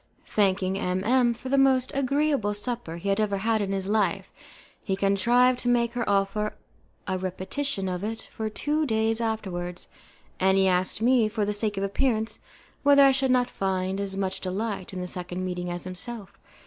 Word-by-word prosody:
Thanking 190 Hz, -2 st, +1 dB
M 185 Hz, 0 st, -1 dB
M 245 Hz, +1 st, +3 dB
for 260 Hz, -, -8 dB
the 275 Hz, +1 st, +3 dB
most 265 Hz, -1 st, +3 dB
agreeable 275 Hz, -5 st, +1 dB
supper 205 Hz, -5 st, -4 dB
he 190 Hz, +4 st, -3 dB
had 195 Hz, +1 st, +1 dB
ever 205 Hz, -2 st, +1 dB
made 225 Hz, -1 st, +2 dB
in 195 Hz, -1 st, -2 dB
his 195 Hz, -1 st, -2 dB
life, 210 Hz, 0 st, 0 dB, 0.5 s
he 195 Hz, -, -1 dB
contrived 235 Hz, +6 st, +3 dB
to -, -, -2 dB
make 235 Hz, -1 st, +2 dB
her 240 Hz, -3 st, -2 dB
offer 200 Hz, +2 st, 0 dB, 0.5 s
a 190 Hz, -1 st, -2 dB
repetition 190 Hz, +5 st, -3 dB
of 180 Hz, 0 st, -3 dB
it 225 Hz, +1 st, -5 dB
for 220 Hz, -1 st, -3 dB
two 300 Hz, +7 st, -1 dB
days 225 Hz, 0 st, +1 dB
afterwards, 180 Hz, -6 st, -3 dB, 0.5 s
and 190 Hz, +1 st, +3 dB
he 190 Hz, 0 st, +4 dB
asked 185 Hz, +3 st, +1 dB
me, 240 Hz, -3 st, +4 dB
for 215 Hz, -1 st, -1 dB
the 210 Hz, -, -1 dB
sake 205 Hz, -1 st, -1 dB
of 195 Hz, -, -1 dB
appearance, 220 Hz, +2 st, 0 dB, 0.4 s
whether 285 Hz, 0 st, +6 dB
I 275 Hz, -, +7 dB
should 265 Hz, 0 st, +1 dB
not 250 Hz, -1 st, +3 dB
find 190 Hz, 0 st, -1 dB
as 195 Hz, -1 st, -3 dB
much 190 Hz, -1 st, -2 dB
delight 195 Hz, +1 st, -3 dB
in 185 Hz, -1 st, -5 dB
that 180 Hz, -, -4 dB
second 180 Hz, 0 st, -5 dB
meeting 180 Hz, -1 st, -3 dB
as 175 Hz, 0 st, -4 dB
himself. 200 Hz, +2 st, -5 dB
205 Hz, 185 wpm, -26 LUFS, 190-240 Hz, 0.5 s, I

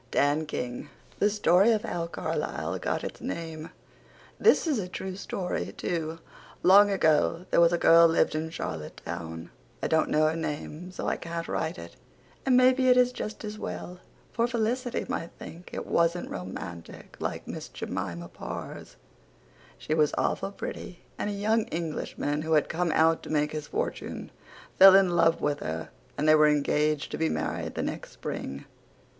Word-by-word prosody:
DAN 145 Hz, +4 st, +1 dB
KING. 125 Hz, -4 st, -4 dB, 0.3 s
THE 205 Hz, -, +4 dB
STORY 200 Hz, +1 st, +4 dB
OF 215 Hz, -, -1 dB
HOW 170 Hz, -1 st, -3 dB
CARLISLE 85 Hz, -, -3 dB
GOT -, -, -2 dB
ITS -, -, -6 dB
NAME 160 Hz, -1 st, -5 dB, 0.7 s
This 450 Hz, -, +5 dB
is 295 Hz, -8 st, +1 dB
a 185 Hz, -, -3 dB
true 185 Hz, +1 st, -5 dB
story 185 Hz, -2 st, -3 dB
to. 165 Hz, -2 st, -2 dB, 0.5 s
Long 200 Hz, +3 st, +7 dB
ago 165 Hz, -2 st, +2 dB
there -, -, +5 dB
was 170 Hz, 0 st, +6 dB
a 175 Hz, -, +2 dB
girl 170 Hz, 0 st, +7 dB
lived 165 Hz, -, +2 dB
in 155 Hz, +1 st, -2 dB
charlotte 80 Hz, -, -6 dB
town. 80 Hz, 0 st, -6 dB, 0.3 s
I -, -, +2 dB
dont 160 Hz, -1 st, +2 dB
know 155 Hz, +1 st, +3 dB
her 155 Hz, +1 st, +1 dB
name 160 Hz, +2 st, -5 dB
so 185 Hz, -, -6 dB
I -, -, 0 dB
cant 170 Hz, 0 st, -5 dB
right 165 Hz, +3 st, -2 dB
it -, -, -10 dB, 0.5 s
and 255 Hz, -1 st, +5 dB
maybe 255 Hz, 0 st, +5 dB
it 250 Hz, -, +6 dB
is 250 Hz, 0 st, +5 dB
just 215 Hz, -3 st, -6 dB
as 210 Hz, 0 st, -6 dB
well 180 Hz, 0 st, -6 dB, 0.3 s
for 235 Hz, 0 st, +1 dB
Felicity 240 Hz, +1 st, -1 dB
might 165 Hz, -, -4 dB
think 170 Hz, +2 st, -10 dB
it -, -, -5 dB
wasnt 170 Hz, +1 st, +1 dB
romantik 90 Hz, -2 st, -8 dB
like -, -, -4 dB
Miss -, -, -6 dB
Jemima 85 Hz, -2 st, -5 dB
Parrs. -, -, -8 dB, 0.8 s
She 155 Hz, -, -3 dB
was 155 Hz, -2 st, +2 dB
awful 195 Hz, -, 0 dB
pretty 180 Hz, -2 st, -7 dB, 0.2 s
and -, -, -1 dB
a -, -, -2 dB
young 215 Hz, +2 st, +1 dB
englishman 155 Hz, -2 st, -3 dB
who 160 Hz, +1 st, -1 dB
had 150 Hz, -, +3 dB
come 170 Hz, 0 st, 0 dB
out 160 Hz, +1 st, +4 dB
to -, -, -10 dB
make 150 Hz, -1 st, +1 dB
his 150 Hz, -1 st, -5 dB
fortune -, -, -4 dB, 0.5 s
fell 190 Hz, 0 st, +10 dB
in 190 Hz, -3 st, +4 dB
love 165 Hz, -1 st, +3 dB
with 145 Hz, -1 st, 0 dB
her 80 Hz, +1 st, -4 dB, 0.3 s
and 150 Hz, +2 st, 0 dB
they 155 Hz, -, +7 dB
were 155 Hz, 0 st, +6 dB
engaged 150 Hz, 0 st, +1 dB
to -, -, -4 dB
be 160 Hz, 0 st, +2 dB
married -, -, -3 dB
the -, -, -2 dB
next -, -, -5 dB
spring. 70 Hz, +1 st, -6 dB
165 Hz, 175 wpm, -28 LUFS, 150-195 Hz, 0.8 s, fell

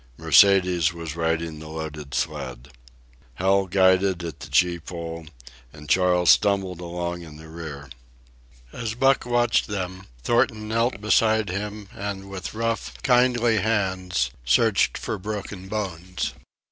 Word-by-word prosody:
Mercedes 90 Hz, -4 st, +4 dB
was 85 Hz, -2 st, -6 dB
riding 80 Hz, -1 st, -1 dB
the 80 Hz, -, -9 dB
loaded 75 Hz, -3 st, -6 dB
sled. 70 Hz, -5 st, -4 dB, 0.7 s
Hal 95 Hz, +3 st, +2 dB
guided 95 Hz, -1 st, +3 dB
at 85 Hz, -2 st, -6 dB
the -, -, -9 dB
gee 90 Hz, -1 st, +2 dB
pole, 85 Hz, -1 st, -7 dB, 0.4 s
and 75 Hz, 0 st, -13 dB
Charles 90 Hz, -1 st, +4 dB
stumbled 95 Hz, -3 st, +2 dB
along 85 Hz, 0 st, -4 dB
in 80 Hz, -3 st, -11 dB
the 80 Hz, +1 st, -12 dB
rear. 80 Hz, -3 st, -8 dB, 0.9 s
As 115 Hz, -1 st, -4 dB
Buck 135 Hz, 0 st, +2 dB
watched 120 Hz, -1 st, +2 dB
them, 95 Hz, -2 st, -5 dB, 0.2 s
Thornton 120 Hz, -, +1 dB
knelt 115 Hz, 0 st, 0 dB
beside 110 Hz, -1 st, +3 dB
him 105 Hz, +1 st, -5 dB
and 100 Hz, -1 st, -6 dB
with 95 Hz, +2 st, -6 dB
rough, 115 Hz, 0 st, -2 dB
kindly 120 Hz, -3 st, +3 dB
hands 95 Hz, -, 0 dB
searched -, -, +3 dB
for 110 Hz, -, -4 dB
broken 100 Hz, -1 st, -6 dB
bones. 90 Hz, -4 st, -4 dB
95 Hz, 130 wpm, -24 LUFS, 85-105 Hz, 0.9 s, Mercedes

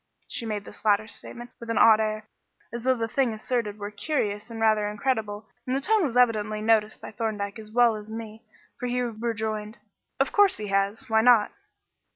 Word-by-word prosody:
She 230 Hz, -, -4 dB
made 210 Hz, -2 st, -3 dB
this 205 Hz, -, -12 dB
latter 215 Hz, 0 st, +3 dB
statement 240 Hz, +3 st, -9 dB
with 235 Hz, -, -9 dB
an 230 Hz, -, 0 dB
odd 220 Hz, -1 st, +7 dB
air, 215 Hz, 0 st, -2 dB, 0.5 s
as 235 Hz, -1 st, -5 dB
though 260 Hz, 0 st, +4 dB
the 225 Hz, -1 st, -1 dB
thing 245 Hz, 0 st, +1 dB
asserted 215 Hz, -2 st, -2 dB
were 205 Hz, 0 st, -6 dB
curious 210 Hz, -4 st, -2 dB
and 230 Hz, -1 st, -7 dB
rather 215 Hz, -1 st, +3 dB
incredible, 215 Hz, -2 st, -2 dB, 0.2 s
and 255 Hz, -, 0 dB
the -, -, +1 dB
tone 420 Hz, +7 st, +3 dB
was 250 Hz, -4 st, -2 dB
evidently 215 Hz, -3 st, +2 dB
noticed 215 Hz, 0 st, +2 dB
by -, -, -9 dB
Thorndyke 210 Hz, -2 st, -3 dB
as 215 Hz, -1 st, -10 dB
well 235 Hz, -1 st, +4 dB
as 210 Hz, 0 st, -9 dB
me 220 Hz, 0 st, -8 dB, 0.4 s
for 250 Hz, -, -3 dB
he 245 Hz, +1 st, -1 dB
rejoined 220 Hz, -2 st, -3 dB, 0.4 s
"Of 270 Hz, -, +2 dB
course 410 Hz, -2 st, +4 dB
he 210 Hz, -1 st, -5 dB
has. 200 Hz, +6 st, 0 dB
Why 220 Hz, -1 st, +3 dB
not?" 230 Hz, -3 st, +5 dB
220 Hz, 195 wpm, -26 LUFS, 210-240 Hz, 0.5 s, odd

